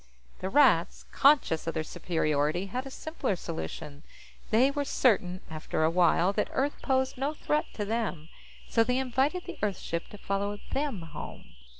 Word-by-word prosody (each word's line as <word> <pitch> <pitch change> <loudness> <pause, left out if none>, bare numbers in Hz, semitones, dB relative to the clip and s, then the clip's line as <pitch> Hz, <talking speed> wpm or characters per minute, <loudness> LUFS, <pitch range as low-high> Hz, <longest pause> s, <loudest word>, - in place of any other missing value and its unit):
The 190 - -3
Rats, 210 - +4
conscious 275 - +4
of 165 - -2
their 160 - 0
superiority, 155 +1 0
had 250 +7 -4
a - - -6
simpler 315 - -3
solution. 155 -4 -6 0.5
They 250 +5 +4
were 285 0 -1
certain, 190 -10 +2
after 155 0 -2
a 160 - +3
while, 180 +2 +3
that - - 0
Earth 280 +2 -1
posed 260 -1 0
no 285 +3 -1
threat 300 0 0
to 210 - -2
them, 205 -8 -2 0.4
so 225 - +3
they 250 +2 0
invited 265 +7 +1
the - - -8
Earth 205 -3 0
ship 170 0 -4
to 210 - -11
follow 200 +1 -2
them 270 - -1
home. 160 - -9
205 Hz, 170 wpm, -29 LUFS, 170-265 Hz, 0.5 s, Rats